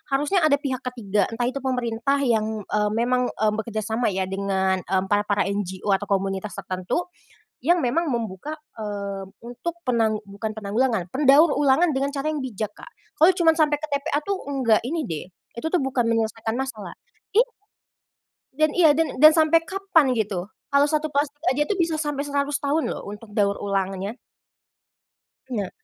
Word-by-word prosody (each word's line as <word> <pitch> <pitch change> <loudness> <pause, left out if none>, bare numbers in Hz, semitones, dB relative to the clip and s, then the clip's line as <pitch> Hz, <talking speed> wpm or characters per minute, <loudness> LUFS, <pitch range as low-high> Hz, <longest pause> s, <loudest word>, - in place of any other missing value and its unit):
harusnya 295 +6 +1
ada 285 - +4
pihak 265 -4 -2
ke-3, 210 -6 0
entah 230 +2 -2
itu 275 - -4
pemerintah 250 +1 0
yang, 220 -3 0
eee 210 0 +1
memang, 250 +2 +1
eee, 215 -1 +2
bekerja 220 -1 -3
sama 225 +3 0
ya 190 0 0
dengan, 190 -1 0
mmm, 190 +1 0
para-para 205 0 +2
NGO, 200 0 -2
atau 205 - -7
komunitas 195 +1 -1
tertentu 190 - -3 0.6
yang 345 +4 +4
memang 315 +6 0
membuka, 235 +6 -4 0.2
eee, 200 -2 -4 0.2
untuk 245 +9 -5
penang 220 -3 +2
bukan 215 +2 -4
penanggulangan, 215 -2 0
pendaur 285 +3 +5
ulangan 290 +4 +3
dengan 275 +1 0
cara 280 +1 -2
yang 300 - -3
bijak, 215 -4 -4
Kak. - - -12 0.3
Kalau 340 +2 +6
cuman 340 -3 +4
sampai 300 -2 +3
ke 310 - -4
TPA 285 +1 -1
tuh, 400 0 0 0.2
enggak 240 -5 +3
ini 315 +4 -2
deh, 160 -2 -4 0.3
itu 275 - -4
tuh 360 - +3
bukan 265 -2 0
menyelesaikan 225 0 -1
masalah, 225 -9 -5 0.4
i 460 - +8 1.2
Dan 310 -1 +3
iya, 340 -3 +5
dan 320 -5 -1
dan 310 - +11
sampai 320 +1 +5
kapan 385 -8 +2
gitu? 200 -3 -2 0.2
Kalau 285 +1 +5
1 310 0 0
plastik 290 +1 0
aja 280 - 0
tuh 410 - 0
bisa 330 -1 +1
sampai 295 -2 -2
100 285 0 -1
tahun 295 +3 +1
loh, - - -5
untuk 210 +2 -9
daur 200 -2 +3
ulangnya. 195 +2 -2 1.3
Nah. 210 -7 -3
245 Hz, 165 wpm, -24 LUFS, 205-295 Hz, 1.3 s, dan